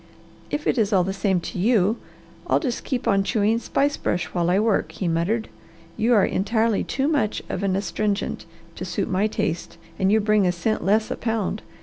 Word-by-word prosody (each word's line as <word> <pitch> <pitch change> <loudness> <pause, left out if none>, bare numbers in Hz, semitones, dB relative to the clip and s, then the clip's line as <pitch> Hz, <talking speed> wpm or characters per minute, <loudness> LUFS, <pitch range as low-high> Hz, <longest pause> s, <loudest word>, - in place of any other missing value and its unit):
"If 295 +1 -3
it - - +2
is 215 -1 +2
all 190 -3 +4
the 190 +2 -2
same 195 -2 +1
to 180 - -6
you, 215 +1 +3 0.5
I'll - - +3
just 255 -7 -3
keep 255 -3 -2
on 195 -1 +3
chewing 220 +2 +1
spice 285 +4 0
brush 175 -1 -1
while 175 -1 +1
I 180 - +3
work," 210 -7 +1
he 180 +2 -3
muttered. 175 +7 0 0.5
"You 230 +2 +3
are 205 - +5
entirely 220 +2 +1
too 270 +1 -1
much 280 -9 0
of - - -3
an 195 -2 +1
astringent 200 +1 -2 0.3
to - - -5
suit - - -2
my 195 +3 +2
taste 170 -5 -3 0.2
and 190 +1 +3
you 220 - +5
bring 210 -2 +3
a - - +3
cent 200 +5 -1
less 215 +3 +2
a - - -1
pound. 220 -2 -2
210 Hz, 205 wpm, -23 LUFS, 190-225 Hz, 0.5 s, are